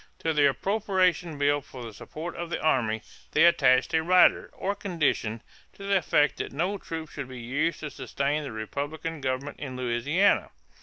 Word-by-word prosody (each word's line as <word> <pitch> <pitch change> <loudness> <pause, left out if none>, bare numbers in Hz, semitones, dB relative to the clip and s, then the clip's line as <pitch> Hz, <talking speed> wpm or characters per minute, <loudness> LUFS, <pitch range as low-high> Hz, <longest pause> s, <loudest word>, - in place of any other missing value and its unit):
To 160 - -1
the 145 -2 +5
appropriation 185 -2 0
bill 145 0 +2
for 130 -2 -10
the 115 -2 -8
support 160 +10 -7
of 170 -1 -5
the - - -2
army 115 -8 +1 0.3
they 155 - +5
attached 130 -6 +4
a 160 - +3
"rider," 180 +3 +4
or 200 - -2
condition, 155 - -1 0.3
to 200 - -12
the 200 0 +2
effect 150 -4 +2
that - - -4
no 180 +8 -1
troops 160 -3 -6
should 140 -3 -5
be 130 -1 -9
used 140 +8 -1
to 150 -2 -5
sustain 140 +3 -2
the 140 - -6
Republican 145 +8 -5
government 130 +2 -3
in 135 -3 -6
Louisiana. 130 +10 +2
150 Hz, 175 wpm, -27 LUFS, 130-170 Hz, 0.3 s, the